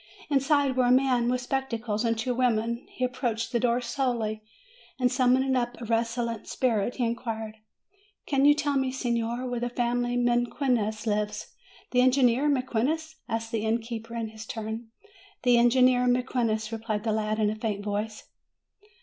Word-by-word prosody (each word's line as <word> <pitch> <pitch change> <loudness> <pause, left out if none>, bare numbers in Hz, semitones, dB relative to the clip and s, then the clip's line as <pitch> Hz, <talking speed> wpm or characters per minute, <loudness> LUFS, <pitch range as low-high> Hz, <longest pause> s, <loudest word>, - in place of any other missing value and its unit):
Inside 280 -1 +2
were 255 -1 +3
a - - +4
man 255 -2 +3
with 250 0 0
spectacles, 240 -4 -2
and 230 -1 +1
two 250 +3 -1
women. 235 -1 0
He 255 - -5
approached 245 -3 -2
the 235 - +1
door 240 +1 +1
slowly, 235 -3 -1 0.6
and 250 -1 +2
summoning 260 +1 +3
up 245 -1 -1
a 240 - -6
resolute 230 0 -1
spirit, 235 -2 0
he 245 - 0
inquired: 225 -2 -4 0.7
"Can 275 -1 +1
you 290 +1 +7
tell 290 -2 0
me, 265 -1 0
signor, 240 -1 -2
where 245 -1 -2
the 245 +1 -2
family 245 0 0
Mequinez 240 -2 0
lives?" 210 -1 -2 0.4
"The 250 - +4
engineer 255 +1 +4
Mequinez?" 285 +5 -1
asked 225 0 -3
the 220 -2 -1
innkeeper 230 +1 -3
in 225 -1 -3
his 220 0 -10
turn. 220 +1 -5 0.6
"The 245 -1 +5
engineer 250 +1 +4
Mequinez," 240 -3 0
replied 220 -2 -3
the 220 -2 0
lad 215 0 -1
in 210 -1 +2
a - - -4
faint 210 -2 -3
voice. 210 +1 -3
240 Hz, 160 wpm, -27 LUFS, 225-255 Hz, 0.7 s, you